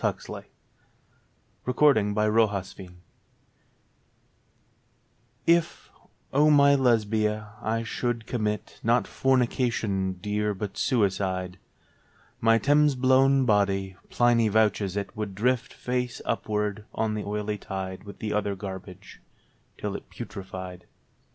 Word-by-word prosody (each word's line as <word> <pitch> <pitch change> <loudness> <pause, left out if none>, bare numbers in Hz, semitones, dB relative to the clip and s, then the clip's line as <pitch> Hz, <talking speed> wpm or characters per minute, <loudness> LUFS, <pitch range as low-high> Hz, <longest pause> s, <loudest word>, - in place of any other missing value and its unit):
32 - - -2
Led - - -6 1.3
a 125 - +1
SECOND 115 -7 +4
PHILOSOPHER'S 105 -3 +2
SONG 90 -2 -12 2.4
IF, 170 0 +1 0.4
O 150 +3 +5
my 140 -1 +6
Lesbia, 110 -4 +1
I 115 +1 -1
should 115 0 -2
commit, 105 -4 -3
Not 120 +2 +2
fornication, 120 -7 0
dear, 105 +2 -2
but 100 0 -5
suicide, 95 -6 0 0.8
My 115 0 +4
Thames 145 +3 +3
blown 130 +1 +4
body 100 -3 +1
(Pliny 120 -2 +3
vouches 105 -2 +1
it) 100 -1 -4
Would 105 -3 -4
drift 125 +4 0
face 125 -1 -3
upwards 105 -2 -1
on 110 -1 0
the 105 -1 -3
oily 105 0 -3
tide 95 -1 -5
With 100 -1 -10
the 105 - -3
other 105 -1 0
garbage, 95 0 -9 0.6
till - - -4
it - - -8
putrefied. 95 -2 -8
105 Hz, 110 wpm, -26 LUFS, 100-120 Hz, 2.4 s, my